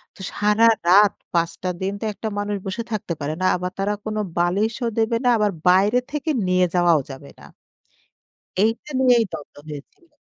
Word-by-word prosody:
তো -, -, -20 dB
সারারাত 210 Hz, -2 st, +4 dB, 0.2 s
৫ 170 Hz, -1 st, +1 dB
টা 185 Hz, -, 0 dB
দিন 195 Hz, +1 st, -1 dB
তো -, -, -3 dB
একটা 215 Hz, +3 st, -6 dB
মানুষ 205 Hz, 0 st, -2 dB
বসে 195 Hz, +5 st, -3 dB
থাকতে 200 Hz, -5 st, -3 dB
পারে 145 Hz, +2 st, -2 dB
না। -, -, +1 dB
আবার 180 Hz, 0 st, -3 dB
তারা 200 Hz, +1 st, 0 dB
কোনো 215 Hz, 0 st, -2 dB, 0.2 s
বালিশও 210 Hz, +7 st, 0 dB
দেবে 225 Hz, +1 st, +1 dB
না। 245 Hz, -, +3 dB
আবার 210 Hz, -1 st, +1 dB, 0.2 s
বাইরে 200 Hz, +7 st, +4 dB
থেকে 300 Hz, +2 st, -3 dB, 0.2 s
নিয়ে 185 Hz, 0 st, +3 dB
যাওয়াও 175 Hz, -3 st, +4 dB
যাবে 135 Hz, +1 st, -11 dB
না। -, -, -14 dB, 1.2 s
এইটা 225 Hz, +7 st, 0 dB
নিয়েই 245 Hz, -3 st, +5 dB
দন্দ 150 Hz, -3 st, -8 dB
হয়েছিল। 150 Hz, -, -11 dB
205 Hz, 170 wpm, -22 LUFS, 175-225 Hz, 1.2 s, নিয়েই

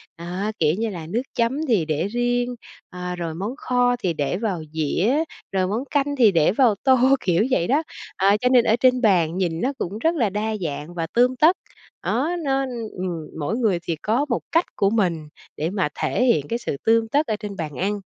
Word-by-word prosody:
À, 180 Hz, +5 st, -4 dB
kiểu 155 Hz, -1 st, +3 dB
như 225 Hz, 0 st, -1 dB
là 165 Hz, -5 st, -7 dB
nước 225 Hz, +8 st, -1 dB
chấm 260 Hz, +7 st, 0 dB
thì 210 Hz, -10 st, +2 dB
để 155 Hz, +4 st, -1 dB
riêng, 245 Hz, +2 st, -1 dB, 0.3 s
à, 180 Hz, 0 st, -5 dB
rồi 165 Hz, -2 st, -4 dB
món 205 Hz, +9 st, -4 dB
kho 245 Hz, -2 st, +1 dB
thì 185 Hz, -7 st, -1 dB
để 150 Hz, +2 st, -1 dB
vào 195 Hz, -6 st, -2 dB
dĩa, 190 Hz, -, +1 dB, 0.3 s
rồi 185 Hz, -1 st, +1 dB
món 215 Hz, +6 st, -2 dB
canh 285 Hz, 0 st, +1 dB
thì 230 Hz, -5 st, +6 dB
để 165 Hz, -3 st, +3 dB
vào 230 Hz, 0 st, +3 dB
tô, 265 Hz, -1 st, +5 dB, 0.2 s
kiểu 180 Hz, +3 st, +2 dB
vậy 175 Hz, -8 st, +2 dB
đó. 290 Hz, +5 st, +2 dB, 0.3 s
À, 200 Hz, +2 st, +4 dB
cho 250 Hz, -, +3 dB
nên 250 Hz, -2 st, +5 dB
ở 220 Hz, -, +4 dB
trên 255 Hz, 0 st, +4 dB
bàn 180 Hz, -7 st, +3 dB
nhìn 170 Hz, -3 st, -1 dB
nó 270 Hz, -, 0 dB
cũng 200 Hz, 0 st, -4 dB
rất 325 Hz, +7 st, +1 dB
là 235 Hz, -9 st, +1 dB
đa 215 Hz, +2 st, -2 dB
dạng 155 Hz, 0 st, -4 dB
và 165 Hz, -2 st, -3 dB
tươm 250 Hz, +2 st, +3 dB
tất, 320 Hz, +8 st, +4 dB, 0.5 s
đó, 280 Hz, +8 st, 0 dB
nó, 270 Hz, -1 st, +1 dB
ưm 235 Hz, -4 st, -5 dB
ừm, 170 Hz, -4 st, -5 dB
mỗi 155 Hz, +10 st, -1 dB
người 215 Hz, -8 st, +1 dB
thì 170 Hz, -1 st, -2 dB
có 235 Hz, +7 st, +1 dB
một 235 Hz, -, 0 dB
cách 335 Hz, +2 st, +3 dB
của 195 Hz, -, +2 dB
mình 175 Hz, -8 st, 0 dB, 0.3 s
để 155 Hz, +2 st, -1 dB
mà 190 Hz, -5 st, -1 dB
thể 250 Hz, -, +1 dB
hiện 155 Hz, -, +2 dB
cái 235 Hz, -, -2 dB
sự 145 Hz, -, -4 dB
tươm 225 Hz, 0 st, +3 dB
tất 290 Hz, +7 st, +1 dB
ở 215 Hz, -, 0 dB
trên 205 Hz, -2 st, -6 dB
bàn 155 Hz, -4 st, -5 dB
ăn. 205 Hz, +2 st, -2 dB
210 Hz, 220 wpm, -23 LUFS, 175-245 Hz, 0.5 s, thì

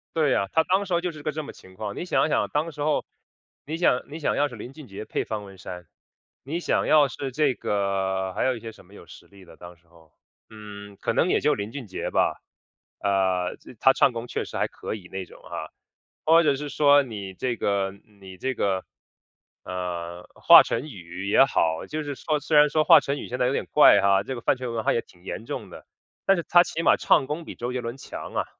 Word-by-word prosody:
对 150 Hz, -5 st, +3 dB
啊， 100 Hz, -, 0 dB
他 160 Hz, -, +4 dB
当 190 Hz, +4 st, +1 dB
时 185 Hz, -, -4 dB
候 170 Hz, -, +2 dB
就 180 Hz, 0 st, -2 dB
是 155 Hz, -2 st, -12 dB
个 155 Hz, -, -1 dB
这 155 Hz, +1 st, -5 dB
么 145 Hz, -, -8 dB
情 95 Hz, -, -17 dB
况。 100 Hz, +2 st, -6 dB
你 -, -, -5 dB
想 170 Hz, -, +1 dB
想， -, -, +1 dB
当 155 Hz, +3 st, -1 dB
时 145 Hz, -, -9 dB
候， 150 Hz, +1 st, +1 dB, 0.6 s
你 155 Hz, +3 st, -4 dB
想 145 Hz, -7 st, +2 dB
你 155 Hz, +3 st, -8 dB
想 150 Hz, -, 0 dB
要 145 Hz, -, +2 dB
是 125 Hz, -, -10 dB
林 120 Hz, +4 st, -9 dB
俊 150 Hz, +1 st, -12 dB
杰 100 Hz, -1 st, -8 dB
配 -, -, -3 dB
方 110 Hz, -2 st, -4 dB
文 95 Hz, -1 st, -13 dB
山， 90 Hz, -2 st, -9 dB, 0.6 s
你 155 Hz, +6 st, -3 dB
想 -, -, 0 dB
要 150 Hz, -2 st, +5 dB
是 135 Hz, 0 st, -6 dB
这 140 Hz, 0 st, +1 dB
个 95 Hz, -2 st, -1 dB
还 -, -, 0 dB
有 130 Hz, -1 st, +1 dB
一 -, -, -8 dB
些 115 Hz, 0 st, -8 dB
什 100 Hz, -, -18 dB
么 95 Hz, -, -20 dB
有 -, -, -14 dB
实 -, -, -14 dB
力 100 Hz, -1 st, -17 dB
的 90 Hz, -, -16 dB
当 90 Hz, 0 st, -12 dB
时 85 Hz, 0 st, -32 dB
候。 80 Hz, -2 st, -22 dB, 0.4 s
嗯， 100 Hz, -2 st, -10 dB
可 -, -, 0 dB
能 175 Hz, -, +2 dB
也 -, -, +3 dB
就 150 Hz, -, +2 dB
林 100 Hz, +2 st, -5 dB
俊 130 Hz, -3 st, -7 dB
杰 95 Hz, -, -5 dB
吧， -, -, +1 dB, 0.6 s
呃， 95 Hz, -2 st, 0 dB
这 -, -, -14 dB
他 135 Hz, -, +6 dB
唱 135 Hz, -, +4 dB
功 115 Hz, +1 st, -5 dB
确 -, -, -3 dB
实 -, -, -10 dB
还 -, -, +1 dB
可 -, -, -7 dB
以 95 Hz, -4 st, -11 dB
那 95 Hz, -1 st, -5 dB
种 -, -, -17 dB
啊。 -, -, -7 dB, 0.6 s
或 165 Hz, +2 st, +6 dB
者 145 Hz, -3 st, +3 dB
是 145 Hz, +1 st, -5 dB
说 145 Hz, 0 st, +5 dB
你 100 Hz, -6 st, -7 dB
这 120 Hz, +6 st, -2 dB
个 100 Hz, -2 st, 0 dB, 0.3 s
你 95 Hz, -1 st, -11 dB
这 130 Hz, +7 st, -2 dB
个， 95 Hz, -5 st, -1 dB, 0.8 s
呃， 90 Hz, -1 st, -5 dB
华 -, -, +9 dB
晨 125 Hz, +6 st, -3 dB
宇 90 Hz, -, -8 dB
也 105 Hz, -, +6 dB
好， 80 Hz, -10 st, 0 dB
就 155 Hz, 0 st, -4 dB
是 145 Hz, -1 st, -4 dB
说 155 Hz, +2 st, -1 dB
虽 150 Hz, +1 st, -1 dB
然 150 Hz, 0 st, +7 dB
说 155 Hz, +1 st, +2 dB
华 -, -, +8 dB
晨 140 Hz, +1 st, -3 dB
宇 -, -, -7 dB
现 125 Hz, -, -4 dB
在 125 Hz, -, +2 dB
有 -, -, +1 dB
点 -, -, -2 dB
怪 150 Hz, -8 st, +7 dB
哈， 100 Hz, 0 st, +4 dB
这 130 Hz, -, -5 dB
个 120 Hz, -, -7 dB
饭 -, -, +2 dB
圈 125 Hz, -1 st, -5 dB
文 115 Hz, -1 st, -2 dB
化 -, -, +2 dB
也 115 Hz, -, 0 dB
挺 90 Hz, -1 st, -23 dB
严 105 Hz, -, -6 dB
重 -, -, -6 dB
的， -, -, -12 dB, 0.4 s
但 195 Hz, 0 st, +4 dB
是 170 Hz, -, -2 dB
他 175 Hz, -, +6 dB
起 165 Hz, -, -4 dB
码 -, -, +5 dB
唱 -, -, +3 dB
功 155 Hz, +3 st, -4 dB
比 -, -, -8 dB
周 120 Hz, +1 st, -4 dB
杰 125 Hz, -, -2 dB
伦 120 Hz, +2 st, -6 dB
强 135 Hz, -, -8 dB
啊。 -, -, 0 dB
120 Hz, 270 characters per minute, -25 LUFS, 95-150 Hz, 0.8 s, 华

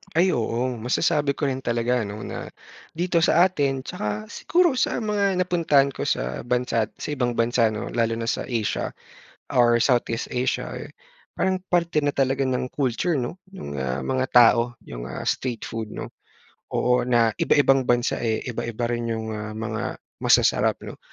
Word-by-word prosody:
Ay, 180 Hz, +3 st, +4 dB
oo 120 Hz, +2 st, -1 dB
masasabi 140 Hz, +4 st, +1 dB
ko 145 Hz, -, -1 dB
rin 130 Hz, -1 st, -2 dB
talaga, 120 Hz, +1 st, 0 dB
'no, 105 Hz, +1 st, -7 dB
na -, -, -6 dB, 0.5 s
dito 175 Hz, +1 st, +1 dB
sa 175 Hz, +3 st, +5 dB
atin 140 Hz, -7 st, -1 dB
tsaka 105 Hz, -1 st, -4 dB
siguro 350 Hz, 0 st, +2 dB
sa -, -, +1 dB
mga 205 Hz, -2 st, +1 dB
napuntahan 165 Hz, -6 st, +3 dB
ko -, -, -5 dB
sa 65 Hz, +1 st, -2 dB
bansa't 120 Hz, -3 st, 0 dB
sa -, -, -5 dB
ibang 120 Hz, -3 st, 0 dB
bansa, 115 Hz, 0 st, +3 dB
'no, 110 Hz, +2 st, -4 dB
lalo 115 Hz, -1 st, +1 dB
na 115 Hz, 0 st, -4 dB
sa -, -, -1 dB
Asia 115 Hz, -4 st, -1 dB, 0.6 s
or 120 Hz, -1 st, +4 dB
Southeast 120 Hz, -2 st, +1 dB
Asia, 125 Hz, +1 st, -1 dB
eh, -, -, -8 dB, 0.4 s
parang 190 Hz, -1 st, +1 dB
parte 170 Hz, -3 st, +2 dB
na 145 Hz, -, +1 dB
talaga 135 Hz, 0 st, +1 dB
ng 130 Hz, -1 st, -1 dB
culture, 145 Hz, +5 st, 0 dB
'no? 140 Hz, +8 st, -4 dB, 0.2 s
Nung, 70 Hz, -, -6 dB
ah, 65 Hz, 0 st, -2 dB
mga 130 Hz, -, 0 dB
tao 120 Hz, 0 st, +5 dB
yung, -, -, -7 dB
ah, 65 Hz, -, -6 dB
street 120 Hz, -4 st, -2 dB
food, 110 Hz, -1 st, -5 dB
'no, -, -, -5 dB, 0.7 s
oo, 125 Hz, 0 st, +2 dB
na 120 Hz, -2 st, +4 dB
iba-ibang 135 Hz, -3 st, +3 dB
bansa, 120 Hz, 0 st, +1 dB
eh, 110 Hz, -2 st, 0 dB
iba-iba 120 Hz, -1 st, -3 dB
rin 120 Hz, 0 st, -2 dB
yung, 110 Hz, 0 st, -4 dB
ah, 105 Hz, 0 st, -5 dB
mga 110 Hz, +1 st, -3 dB
mga -, -, -49 dB, 0.2 s
masasarap, -, -, +3 dB
'no. -, -, -9 dB
125 Hz, 170 wpm, -24 LUFS, 115-140 Hz, 0.7 s, sa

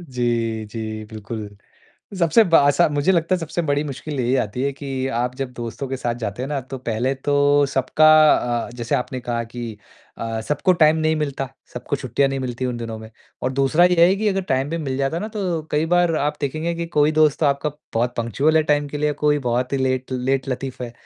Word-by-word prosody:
जी, 120 Hz, -6 st, -2 dB
जी, 110 Hz, 0 st, -6 dB
बिल्कुल। 105 Hz, -1 st, -7 dB, 0.6 s
सबसे 175 Hz, +6 st, +5 dB
बा 165 Hz, -4 st, +5 dB
अस 145 Hz, -, +2 dB
मुझे 145 Hz, +5 st, +2 dB
लगता 170 Hz, +1 st, +2 dB
है -, -, 0 dB
सबसे 165 Hz, +1 st, -3 dB
बड़ी 145 Hz, -2 st, 0 dB
मुश्किल 145 Hz, 0 st, -5 dB
यही 125 Hz, +1 st, +1 dB
आती 110 Hz, +5 st, -4 dB
है 140 Hz, +1 st, 0 dB
कि 135 Hz, -1 st, -4 dB
आप 125 Hz, +1 st, -2 dB
जब 130 Hz, -1 st, -5 dB
दोस्तों 120 Hz, +3 st, -6 dB
के 135 Hz, -, -3 dB
साथ 120 Hz, -2 st, -2 dB
जाते 115 Hz, 0 st, -5 dB
हैं 135 Hz, -, -3 dB
ना। 145 Hz, -2 st, -2 dB
तो 130 Hz, +1 st, -8 dB
पहले 125 Hz, +2 st, -1 dB
तो 145 Hz, +1 st, +2 dB
सबका 135 Hz, +3 st, +2 dB, 0.6 s
अ, -, -, -11 dB
जैसे 120 Hz, -2 st, -2 dB
आपने 125 Hz, +1 st, -2 dB
कहा 120 Hz, -1 st, -2 dB
कि 115 Hz, -1 st, -7 dB, 0.4 s
अ, 115 Hz, -1 st, -3 dB
सबको 165 Hz, +5 st, +2 dB
टाइम 155 Hz, -2 st, +4 dB
नहीं 155 Hz, 0 st, +1 dB
मिलता, 140 Hz, -3 st, -2 dB, 0.2 s
सबको 125 Hz, +3 st, -3 dB
छुट्टियाँ 135 Hz, +1 st, 0 dB
नहीं 135 Hz, 0 st, -2 dB
मिलती 130 Hz, 0 st, -3 dB
उन 125 Hz, -1 st, -3 dB
दिनों 115 Hz, -1 st, -5 dB
में। 110 Hz, 0 st, -11 dB, 0.3 s
और 130 Hz, -, 0 dB
दूसरा 135 Hz, +5 st, +3 dB
ये 175 Hz, -1 st, +5 dB
है 185 Hz, -, +3 dB
कि 215 Hz, +1 st, 0 dB
अगर 195 Hz, -1 st, 0 dB
टाइम 130 Hz, +2 st, 0 dB
भी 165 Hz, -, -2 dB
मिल 135 Hz, -5 st, -3 dB
जाता 135 Hz, +3 st, -1 dB
है -, -, -2 dB
ना। 215 Hz, -, -3 dB
तो 185 Hz, -7 st, -2 dB
कई 150 Hz, +2 st, +1 dB
बार 175 Hz, 0 st, +3 dB
आप 150 Hz, 0 st, 0 dB
देखेंगे 155 Hz, +4 st, -2 dB
कि 170 Hz, 0 st, -4 dB
कोई 150 Hz, -2 st, +2 dB
दोस्त 155 Hz, -2 st, +3 dB
तो 155 Hz, -, +3 dB
आपका 140 Hz, +2 st, 0 dB, 0.2 s
बहुत 120 Hz, +2 st, 0 dB
पंक्चुअल 135 Hz, +7 st, +1 dB
है 160 Hz, -, +5 dB
टाइम 145 Hz, -1 st, +1 dB
के 150 Hz, -, -5 dB
लिए, 150 Hz, 0 st, +1 dB
कोई 150 Hz, 0 st, +1 dB
बहुत 125 Hz, -1 st, -1 dB
ही 140 Hz, -, +1 dB
लेट 130 Hz, 0 st, -1 dB
लेट 130 Hz, +1 st, -1 dB
लतीफ़ 130 Hz, 0 st, -4 dB
है। 120 Hz, -1 st, -6 dB
135 Hz, 230 wpm, -21 LUFS, 120-155 Hz, 0.6 s, सबसे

